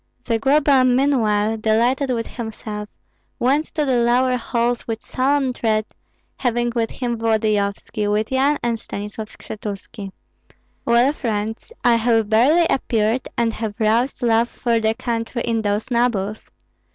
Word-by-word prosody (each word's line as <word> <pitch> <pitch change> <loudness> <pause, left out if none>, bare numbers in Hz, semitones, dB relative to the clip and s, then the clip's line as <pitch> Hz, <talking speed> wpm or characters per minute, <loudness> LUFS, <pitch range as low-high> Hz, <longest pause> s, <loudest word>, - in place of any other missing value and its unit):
Zagloba 270 +3 +3
meanwhile, 235 -5 +2
delighted 235 +5 +1
with 230 -2 -1
himself, 215 -2 -6 0.5
went 280 +6 +1
to 305 -2 +1
the 260 -3 +2
lower 245 +2 +3
halls 240 0 -1
with 225 -1 -4
solemn 270 0 0
tread, 215 -3 0 0.5
having 240 -1 0
with 230 -1 0
him 240 -3 -3
Volodyovski, 215 -2 0
with 210 +3 0
Yan 275 +3 +2
and 235 -1 0
Stanislav 210 +2 -6
Skshetuski. 205 -1 -8 0.7
"Well, 240 +4 +4
friends, 225 - -3
I 235 -1 +5
have 225 -2 +2
barely 275 +10 +4
appeared 230 0 0
and 230 -1 +1
have 220 -2 -4
roused 235 +4 +1
love 230 0 +3
for 235 -2 0
the 220 0 +1
country 230 0 -3
in 230 -1 0
those 210 +3 -2
nobles. 220 -4 0
230 Hz, 135 wpm, -21 LUFS, 220-250 Hz, 0.7 s, I